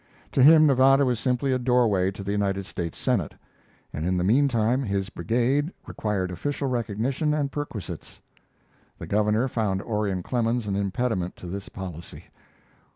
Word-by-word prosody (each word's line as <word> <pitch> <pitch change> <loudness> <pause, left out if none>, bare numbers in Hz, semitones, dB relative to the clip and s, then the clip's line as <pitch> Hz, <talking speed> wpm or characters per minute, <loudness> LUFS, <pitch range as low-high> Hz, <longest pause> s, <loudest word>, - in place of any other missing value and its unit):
To 135 - +2
him 155 +3 +8
Nevada 135 0 +5
was 125 -3 0
simply 130 +2 0
a 130 - +1
doorway 120 -7 +2
to 100 0 -7
the 100 - -3
United 100 -1 -1
States 85 -3 -5
Senate, 115 - -1 0.6
and 75 - -4
in 90 +2 0
the 90 - 0
mean 125 +10 +4
time 120 +1 +1
his 100 -4 -2
brigade 130 +9 0
required 100 -4 -2
official 140 - -3
recognition 125 +5 -1
and 145 -2 -1
perquisites. 140 - -6 0.8
The - - -7
governor 105 +4 +1
found 105 -6 -1
Orion 105 -5 -2
Clemens 120 0 0
an 100 -2 -2
impediment 100 -2 -1
to - - -12
this 95 +2 -6
policy. 90 -4 -8
110 Hz, 155 wpm, -25 LUFS, 95-130 Hz, 0.8 s, him